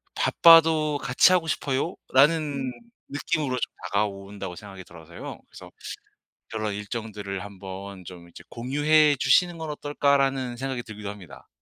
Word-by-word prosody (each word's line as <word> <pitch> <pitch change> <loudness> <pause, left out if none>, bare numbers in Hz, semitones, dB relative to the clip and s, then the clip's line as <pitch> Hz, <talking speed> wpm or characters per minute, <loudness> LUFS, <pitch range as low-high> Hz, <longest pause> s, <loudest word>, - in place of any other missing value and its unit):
'바빠도 160 -3 +5
같이 135 +7 +4
하고 175 -3 +1
싶어요.'라는 145 -1 +1 0.4
느낌으로 145 -2 -2
좀 - - -3
다가온다고 100 -2 -3
생각이 95 -1 -11
들어서요. 85 -1 -10
그래서 - - -13 0.8
그런 110 -2 -3
일정들을 105 -2 -5
한번 95 -1 -9
좀 85 -1 -11
이제 85 0 -14
공유해 145 +4 +3
주시는 170 +7 +3
건 160 -1 -5
어떨까라는 140 -4 0
생각이 130 -1 -3
들기도 105 -3 -8
합니다. 100 -5 -12
125 Hz, 330 characters per minute, -25 LUFS, 100-145 Hz, 0.8 s, 바빠도